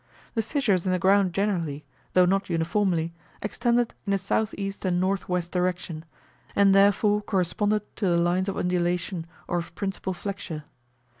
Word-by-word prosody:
The 225 - +1
fissures 220 - +1
in - - +2
the 185 - +2
ground 190 +1 +4
generally, 170 -7 -1 0.3
though 180 0 +6
not 195 +2 +1
uniformly, 170 0 +1 0.3
extended 235 +2 +1
in 200 - +2
a - - +4
S.E. 195 +1 -1
and - - -13 0.2
N.W. 185 -2 0
direction, 180 -3 -2 0.5
and 200 -1 +5
therefore 205 +1 +4
corresponded 205 +2 0
to 200 - 0
the 175 -1 +3
lines 175 +3 +2
of 195 - -3
undulation 175 -1 -1 0.2
or 175 - 0
of 170 0 -8
principal 195 -2 -3
flexure. 175 -4 -5
190 Hz, 150 wpm, -26 LUFS, 175-200 Hz, 0.5 s, though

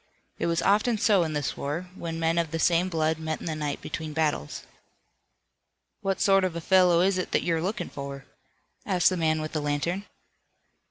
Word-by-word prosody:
It - - 0
was 170 0 0
often 215 +3 +3
so 205 -3 +4
in 160 -2 -1
this 145 -3 -2
war, 165 +6 -4
when 165 -3 -5
men 165 +1 +1
of 165 -2 0
the 165 - -3
same 170 +2 +2
blood 160 -2 0
met 160 0 -3
in - - -9
the 160 - -2
night 150 -2 -3
between 155 -1 -5
battles. 150 - -1 1.4
"What 195 -1 -1
sort 195 -1 +4
of 185 -3 -1
a - - -2
fellow 180 0 +4
is 190 0 +2
it 185 - -3
that - - +2
you're 165 -2 0
lookin' 200 +7 -2
for?" 140 -1 -7 0.6
asked 185 -2 +3
the - - 0
man 160 -2 +1
with 155 - -4
the 155 - -2
lantern. 150 +7 -2
165 Hz, 200 wpm, -27 LUFS, 155-185 Hz, 1.4 s, so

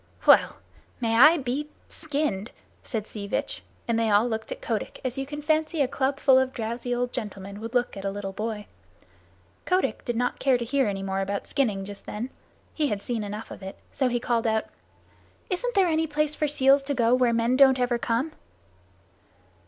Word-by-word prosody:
"Well! - - +6 0.4
May 225 -2 +1
I 300 +8 +8
be 280 +2 -3 0.2
skinned!" 285 - -2 0.3
said 220 -3 -4
Sea 205 -2 -7
Vitch, - - -2 0.3
and 230 -1 +1
they 225 -1 +2
all 210 +3 +4
looked 220 - -4
at - - -4
Kotick - - -3
as 255 -1 -1
you 270 - -3
can 295 +1 -6
fancy 315 +1 +1
a 275 - +3
club 270 +1 -1
full 265 -2 +6
of 260 0 0
drowsy 235 +2 -3
old 245 0 -2
gentlemen 200 -4 -6
would 230 +2 -6
look 245 0 +1
at 195 - -7
a 195 - 0
little 195 -1 -5
boy. 215 0 -4 1.0
Kotick 370 +1 +1
did 240 - -2
not 245 +1 -1
care 265 -2 +3
to 240 - -4
hear 270 +1 +1
any 195 -1 -2
more 195 0 -1
about 200 +1 -2
skinning 210 -9 0
just 205 0 -9
then; 240 +5 -4 0.4
he 305 -2 +1
had 205 -5 -3
seen 235 -3 -2
enough 210 +2 -6
of - - -9
it. 190 0 -8 0.2
So 265 - +1
he 245 -1 0
called 235 -1 0
out: 220 0 +1 0.9
"Isn't 485 +7 -1
there 385 -2 +5
any 320 -1 +1
place 300 0 0
for 300 - 0
seals 275 -1 +4
to 285 0 -1
go 235 -1 +3
where 250 -1 +4
men 230 +2 +2
don't 265 -1 +6
ever 245 -1 +1
come?" 240 +7 0
245 Hz, 200 wpm, -26 LUFS, 220-280 Hz, 1.0 s, I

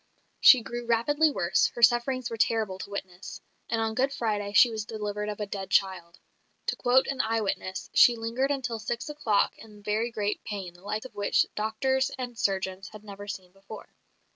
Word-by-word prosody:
She 255 -4 +8
grew 240 0 -6
rapidly 290 +7 +3
worse; 175 -10 +2
her 235 - -3
sufferings 240 +1 +3
were - - -3
terrible 220 -4 0
to 200 - -7
witness; 190 -2 -7 0.3
and 225 - 0
on 225 0 -1
Good 265 +4 +1
Friday 210 -6 -2
she 235 +4 +6
was 220 -1 -3
delivered 210 -1 -4
of 210 - -5
a 210 - -2
dead 195 -1 -6
child. 185 -3 0 0.5
To - - 0
quote 255 +1 +3
an 270 -1 -1
eye 225 +1 0
witness, 190 -2 -3
"She 240 - +7
lingered 230 +4 -1
until 250 -5 -2
six 235 +5 -4
o'clock 235 -9 +1
in 210 -2 -14
very 215 +3 0
great 210 -2 -3
pain, 195 -4 -6
the 175 - -19
like 215 +4 -4
of 260 - -10
which 205 0 +2
doctors 260 +5 0
and 250 -2 -5
surgeons 190 -1 -2
had 215 0 -11
never 205 -1 -9
seen 185 -3 -7
before. 195 +3 -12
220 Hz, 190 wpm, -27 LUFS, 200-240 Hz, 0.5 s, She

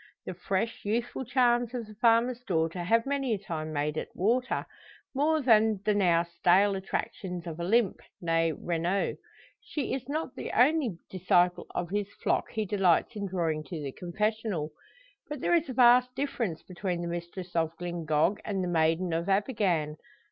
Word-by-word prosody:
The - - -4
fresh, 195 +5 -2
youthful 235 +5 -2
charms 245 -1 +2
of 235 -2 -3
the 215 - -12
farmer's 235 +3 +3
daughter 165 -4 -1
have 230 +5 +3
many 270 -4 0
a - - -4
time 155 -5 -5
made 150 0 -1
it - - -3
water, 240 +7 0 0.5
more 300 +2 +2
than 220 -4 +4
the 210 - +3
now 175 -4 +3
stale 180 +4 +3
attractions 185 -2 -4
of 165 -1 -6
Olympe, 200 +4 +1 0.2
nee 165 -1 +1
Renault. 170 +5 -1 0.4
She 295 - -4
is 265 0 -4
not 305 -2 -3
the - - -5
only 255 - +3
disciple 180 -1 +2
of 175 0 -3
his 205 0 -2
flock - - -1
he 220 -1 -2
delights 195 +1 +2
in 200 -1 -3
drawing 165 -4 -1
to 170 -4 -6
the 140 -2 -4
confessional. 195 - -2 0.6
But 295 -2 -5
there 345 - +1
is 335 -3 +2
a - - -3
vast 250 +1 +5
difference 250 - -2
between 180 -1 -4
the - - -3
mistress 175 +1 -6
of 165 0 0
Glyngog 170 +1 0
and 195 -3 -2
the - - -2
maiden 165 +1 +1
of 170 +3 -1
Abergann. 195 - +1
195 Hz, 170 wpm, -29 LUFS, 170-235 Hz, 0.6 s, vast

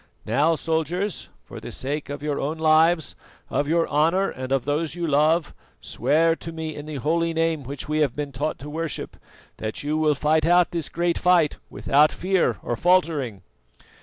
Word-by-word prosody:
Now, 145 +9 +2
soldiers, 165 +5 -2
for - - -10
the - - -8
sake 145 +3 -3
of 145 0 -6
your 150 -2 -1
own 150 +4 -2
lives, 160 0 +3 0.4
of 145 - 0
your 165 +1 +2
honour 165 +7 +2
and 130 0 -7
of 135 -2 +1
those 150 +2 -1
you 175 -1 -2
love, 155 +2 +2 0.3
swear 165 +2 +1
to 165 - -7
me, 160 -1 -5
in 145 +1 -8
the 155 - -6
holy 165 +5 0
Name 165 -1 +1
which 135 +2 -7
we 155 +1 0
have 145 -5 +1
been 145 -1 -4
taught 145 +4 -3
to - - -7
worship, 160 0 -4 0.4
that 110 +4 -4
you 150 +2 -1
will 155 -1 +3
fight 155 +2 +2
out 175 0 +4
this 165 -4 -3
great 170 0 -1
fight 175 -4 +3
without 150 +2 +3
fear 190 0 0
or - - -2
faltering." 155 - +1
155 Hz, 185 wpm, -24 LUFS, 145-165 Hz, 0.4 s, out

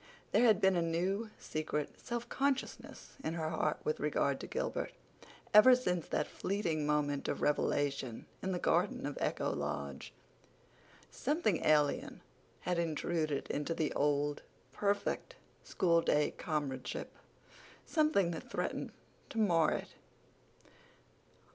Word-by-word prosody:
There 245 - +5
had 220 -5 +6
been 190 -1 +4
a 175 - +2
new, 185 +6 0
secret 155 -1 -3
self 240 0 -4
consciousness 275 -1 -2
in 160 - -2
her 160 -2 -2
heart 155 -1 0
with 155 - -1
regard 140 -2 +1
to - - -6
Gilbert, - - -2 0.6
ever 250 +5 +9
since 180 -10 -1
that - - 0
fleeting 170 -7 -2
moment 145 -1 0
of - - -2
revelation 140 -4 0 0.2
in 190 - -2
the 180 - 0
garden - - +1
of - - -3
Echo - - 0
Lodge. 70 -1 -4 1.0
Something 275 - 0
alien 150 -2 +2 0.4
had 175 0 0
intruded 160 -2 -1
into 150 +3 -2
the 155 - 0
old, 145 0 +1 0.3
perfect, 200 0 -1 0.3
school 170 -2 +2
day 150 -2 +2
comradeship—something 170 - -2
that 165 - -7
threatened - - -3 0.4
to - - -7
mar 170 -8 +4
it. - - -3
165 Hz, 125 wpm, -34 LUFS, 145-195 Hz, 1.0 s, ever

